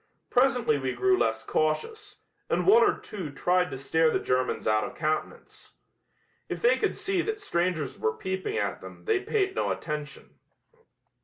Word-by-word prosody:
Presently 245 Hz, -, +3 dB
we 130 Hz, -1 st, -2 dB
grew 190 Hz, +10 st, +3 dB
less 110 Hz, -9 st, 0 dB
cautious, 415 Hz, -, -2 dB, 0.3 s
and -, -, +1 dB
one 440 Hz, +5 st, +7 dB
or 415 Hz, -2 st, +3 dB
two 190 Hz, -7 st, -7 dB
tried 180 Hz, +5 st, +1 dB
to 135 Hz, -, -6 dB
stare 160 Hz, +4 st, +2 dB
the -, -, +1 dB
Germans 130 Hz, 0 st, -1 dB
out 110 Hz, 0 st, +3 dB
of 125 Hz, -, -6 dB
countenance. 155 Hz, 0 st, -4 dB, 0.7 s
If -, -, -3 dB
they 480 Hz, -, +5 dB
could -, -, 0 dB
see 385 Hz, -2 st, 0 dB
that 435 Hz, +3 st, -3 dB
strangers 170 Hz, -, -1 dB
were 110 Hz, 0 st, -1 dB
peeping 190 Hz, -, -3 dB
at -, -, -2 dB
them -, -, -12 dB
they 435 Hz, -3 st, +2 dB
paid 390 Hz, -1 st, 0 dB
no -, -, -1 dB
attention. 150 Hz, -2 st, -5 dB
180 Hz, 165 wpm, -27 LUFS, -, 0.7 s, one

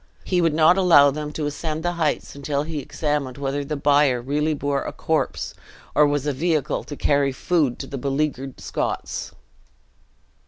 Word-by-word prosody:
He 180 Hz, -2 st, +1 dB
would 165 Hz, -3 st, +2 dB
not 160 Hz, +4 st, +5 dB
allow 155 Hz, -7 st, +6 dB
them 150 Hz, +1 st, -5 dB
to 155 Hz, -, -3 dB
ascend 155 Hz, +2 st, -3 dB
the 175 Hz, -, +1 dB
heights 165 Hz, -4 st, -1 dB
until 140 Hz, 0 st, -2 dB
he 160 Hz, 0 st, -5 dB
had -, -, -2 dB
examined 145 Hz, -2 st, -2 dB
whether 140 Hz, 0 st, -2 dB
the 150 Hz, +2 st, -3 dB
bier 140 Hz, -3 st, +3 dB
really 150 Hz, +5 st, 0 dB
bore 140 Hz, -1 st, -1 dB
a -, -, -4 dB
corpse, -, -, -2 dB, 0.4 s
or 150 Hz, -, +5 dB
was 145 Hz, -1 st, -1 dB
a 145 Hz, -, 0 dB
vehicle 155 Hz, 0 st, 0 dB
to 145 Hz, -, -7 dB
carry 140 Hz, -1 st, +2 dB
food 145 Hz, -2 st, 0 dB
to -, -, -6 dB
the 135 Hz, -, -6 dB
beleaguered 135 Hz, -1 st, -2 dB
Scots. -, -, -3 dB
145 Hz, 180 wpm, -23 LUFS, 140-155 Hz, 0.4 s, allow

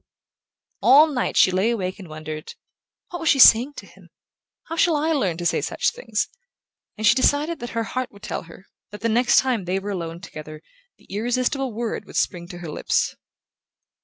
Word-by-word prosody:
All 290 Hz, +4 st, +7 dB
night 250 Hz, -, -1 dB
she 185 Hz, -, +6 dB
lay 190 Hz, +5 st, +1 dB
awake 190 Hz, -5 st, -3 dB
and 190 Hz, -, -10 dB
wondered: 155 Hz, 0 st, -8 dB, 0.6 s
"What 350 Hz, -, -5 dB
was 330 Hz, -2 st, 0 dB
she -, -, +4 dB
saying 255 Hz, +2 st, +7 dB
to -, -, -9 dB
him? -, -, -19 dB, 0.5 s
How 330 Hz, -, -6 dB
shall 335 Hz, -1 st, +3 dB
I 305 Hz, +2 st, 0 dB
learn 195 Hz, -, 0 dB
to 175 Hz, -, -5 dB
say -, -, +1 dB
such -, -, 0 dB
things?" -, -, -2 dB, 0.7 s
and 215 Hz, -, -2 dB
she 210 Hz, -, +7 dB
decided 290 Hz, +6 st, +1 dB
that 240 Hz, -, -6 dB
her 230 Hz, -, +1 dB
heart 255 Hz, +4 st, -4 dB
would 200 Hz, +1 st, -18 dB
tell -, -, -4 dB
her 185 Hz, +3 st, -14 dB, 0.2 s
that 210 Hz, +1 st, -10 dB
the 230 Hz, -, 0 dB
next 240 Hz, +3 st, +3 dB
time 245 Hz, -7 st, +2 dB
they 185 Hz, +2 st, -1 dB
were 200 Hz, +1 st, -4 dB
alone 170 Hz, -3 st, -5 dB
together 155 Hz, -4 st, -10 dB, 0.3 s
the -, -, -24 dB
irresistible 250 Hz, +5 st, -1 dB
word 230 Hz, +1 st, -4 dB
would -, -, -13 dB
spring 175 Hz, -3 st, -1 dB
to 175 Hz, -1 st, -9 dB
her 175 Hz, -2 st, -8 dB
lips. -, -, 0 dB
220 Hz, 195 wpm, -23 LUFS, 180-260 Hz, 0.7 s, All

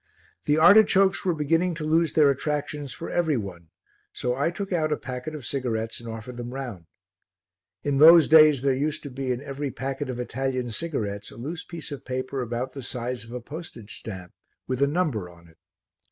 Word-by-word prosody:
The 150 Hz, +1 st, +3 dB
artichokes 195 Hz, +2 st, +6 dB
were 180 Hz, -3 st, +1 dB
beginning 165 Hz, +4 st, +1 dB
to 155 Hz, -, -5 dB
lose 160 Hz, 0 st, +2 dB
their 150 Hz, -3 st, +5 dB
attractions 145 Hz, 0 st, -3 dB
for 165 Hz, -, -6 dB
every 160 Hz, -5 st, +1 dB
one, 90 Hz, -6 st, -7 dB, 0.4 s
so 125 Hz, -, -2 dB
I 140 Hz, +5 st, +1 dB
took 195 Hz, +2 st, -4 dB
out 155 Hz, -3 st, +1 dB
a 150 Hz, -, +1 dB
packet 130 Hz, +4 st, -6 dB
of 145 Hz, -6 st, -8 dB
cigarettes 115 Hz, -4 st, -2 dB
and 120 Hz, -1 st, -8 dB
offered 115 Hz, +2 st, -7 dB
them 120 Hz, +1 st, -6 dB
round. 120 Hz, -12 st, -6 dB, 1.0 s
In 140 Hz, -1 st, 0 dB
those 165 Hz, +1 st, +9 dB
days 155 Hz, -4 st, +7 dB
there 135 Hz, -1 st, +3 dB
used 150 Hz, +3 st, -1 dB
to 145 Hz, -, -7 dB
be 130 Hz, 0 st, -3 dB
in 125 Hz, +2 st, -3 dB
every 140 Hz, 0 st, -4 dB
packet 135 Hz, +1 st, -4 dB
of 125 Hz, -1 st, -4 dB
Italian 125 Hz, 0 st, -2 dB
cigarettes 105 Hz, -9 st, -3 dB
a -, -, -13 dB
loose 155 Hz, +8 st, -5 dB
piece 165 Hz, -3 st, -8 dB
of 140 Hz, -, -6 dB
paper 130 Hz, +1 st, -3 dB
about 125 Hz, +2 st, -3 dB
the 135 Hz, -, -7 dB
size 125 Hz, -1 st, -4 dB
of 115 Hz, -, -13 dB
a 125 Hz, 0 st, -5 dB
postage 130 Hz, -6 st, -9 dB
stamp 95 Hz, -5 st, -8 dB, 0.3 s
with 130 Hz, +1 st, -3 dB
a 140 Hz, -, +5 dB
number 145 Hz, -, -1 dB
on 85 Hz, -1 st, -17 dB
it. 80 Hz, -, -23 dB
135 Hz, 195 wpm, -25 LUFS, 120-155 Hz, 1.0 s, those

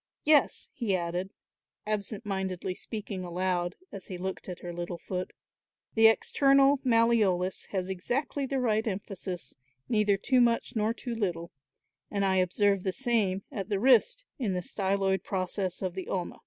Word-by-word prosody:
Yes," 295 Hz, -2 st, +3 dB
he 220 Hz, -6 st, 0 dB
added, 175 Hz, +1 st, -2 dB, 0.6 s
absent 210 Hz, 0 st, -3 dB
mindedly 190 Hz, -2 st, -2 dB
speaking 205 Hz, -1 st, -6 dB
aloud, 175 Hz, 0 st, -1 dB, 0.2 s
as 195 Hz, -, -9 dB
he 185 Hz, -, -5 dB
looked 190 Hz, +1 st, -5 dB
at 180 Hz, -, -7 dB
her 175 Hz, -1 st, -6 dB
little 175 Hz, 0 st, -4 dB
foot, 185 Hz, +1 st, -4 dB, 0.6 s
"the 225 Hz, 0 st, +7 dB
external 275 Hz, +4 st, +4 dB
malleolus 225 Hz, -7 st, +2 dB
has 185 Hz, -2 st, -3 dB
exactly 265 Hz, +9 st, -2 dB
the 270 Hz, 0 st, -1 dB
right 220 Hz, -2 st, +1 dB
emphasis, 190 Hz, -3 st, -5 dB, 0.3 s
neither 210 Hz, -3 st, +3 dB
too 255 Hz, +5 st, +3 dB
much 235 Hz, +1 st, +1 dB
nor 215 Hz, 0 st, +1 dB
too 240 Hz, +1 st, -5 dB
little, 175 Hz, -6 st, -2 dB, 0.6 s
and 200 Hz, -1 st, 0 dB
I 190 Hz, -1 st, +2 dB
observe 195 Hz, +2 st, +2 dB
the 190 Hz, -, -1 dB
same 205 Hz, -5 st, 0 dB
at 195 Hz, 0 st, -5 dB
the 200 Hz, -2 st, 0 dB
wrist 265 Hz, -, +4 dB
in 215 Hz, -7 st, 0 dB
the 180 Hz, -, -1 dB
styloid 195 Hz, 0 st, 0 dB
process 185 Hz, 0 st, -2 dB
of 185 Hz, -2 st, -2 dB
the 190 Hz, 0 st, -6 dB
ulna. 180 Hz, -2 st, -3 dB
195 Hz, 155 wpm, -29 LUFS, 185-230 Hz, 0.6 s, the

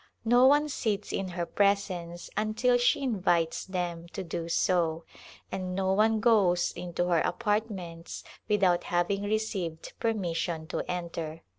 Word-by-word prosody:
No 245 Hz, +3 st, +6 dB
one 295 Hz, +2 st, +4 dB
sits 215 Hz, -7 st, -2 dB
in 195 Hz, -, -1 dB
her 175 Hz, -1 st, -3 dB
presence 185 Hz, -4 st, 0 dB
until 220 Hz, +4 st, +2 dB
she 250 Hz, +4 st, +2 dB
invites 180 Hz, -9 st, +1 dB
them 175 Hz, -2 st, -3 dB
to -, -, -4 dB
do 165 Hz, -1 st, -4 dB
so, 165 Hz, -2 st, +1 dB, 0.5 s
and 185 Hz, -1 st, -3 dB
no 190 Hz, 0 st, +1 dB
one 220 Hz, +2 st, +3 dB
goes 200 Hz, -6 st, +3 dB
into 175 Hz, 0 st, -3 dB
her 170 Hz, -2 st, +4 dB
apartments 195 Hz, -6 st, -2 dB, 0.3 s
without 190 Hz, -4 st, +3 dB
having 175 Hz, +3 st, 0 dB
received 205 Hz, -6 st, -2 dB
permission 175 Hz, -7 st, -1 dB
to -, -, -2 dB
enter. 170 Hz, -2 st, -4 dB
185 Hz, 135 wpm, -29 LUFS, 170-215 Hz, 0.5 s, No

